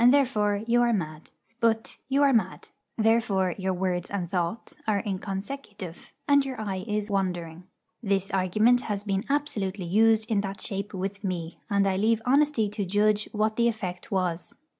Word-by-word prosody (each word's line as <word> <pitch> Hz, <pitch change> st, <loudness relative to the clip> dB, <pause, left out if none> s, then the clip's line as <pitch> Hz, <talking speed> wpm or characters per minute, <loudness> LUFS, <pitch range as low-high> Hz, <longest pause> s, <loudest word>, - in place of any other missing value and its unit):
therefore 215 Hz, -7 st, +2 dB
you 240 Hz, +1 st, +3 dB
are 240 Hz, 0 st, +3 dB
mad;' 155 Hz, -6 st, -4 dB, 0.3 s
but, 225 Hz, -1 st, +1 dB
'You 275 Hz, +2 st, +3 dB
are 275 Hz, -1 st, +5 dB
mad; 225 Hz, -, 0 dB, 0.3 s
therefore 220 Hz, -5 st, +2 dB
your 190 Hz, 0 st, 0 dB
words 180 Hz, -1 st, -1 dB
and 190 Hz, -4 st, -2 dB
thoughts 190 Hz, +4 st, -2 dB
are 205 Hz, -2 st, +2 dB
inconsecutive, 195 Hz, -1 st, -5 dB, 0.2 s
and 285 Hz, -1 st, +5 dB
your 265 Hz, -3 st, -5 dB
eye 195 Hz, -3 st, -3 dB
is 210 Hz, 0 st, -2 dB
wandering.' 175 Hz, -3 st, -2 dB, 0.4 s
This 195 Hz, -2 st, 0 dB
argument 215 Hz, +6 st, +3 dB
has 205 Hz, -1 st, -2 dB
been 195 Hz, -1 st, -1 dB
absolutely 210 Hz, -10 st, -1 dB
used 220 Hz, +4 st, +4 dB
in 210 Hz, -3 st, +1 dB
that 195 Hz, -1 st, -5 dB
shape 200 Hz, 0 st, -4 dB
with 195 Hz, +2 st, -4 dB
me; 175 Hz, -3 st, -4 dB
and 200 Hz, -1 st, +3 dB
I 190 Hz, -1 st, +1 dB
leave 225 Hz, +2 st, +2 dB
honesty 275 Hz, -3 st, +3 dB
to 210 Hz, 0 st, -3 dB
judge 210 Hz, +2 st, +2 dB
what 215 Hz, +1 st, 0 dB
the 235 Hz, 0 st, +4 dB
effect 190 Hz, -6 st, -3 dB
was. 180 Hz, -3 st, -1 dB
205 Hz, 165 wpm, -27 LUFS, 190-225 Hz, 0.4 s, are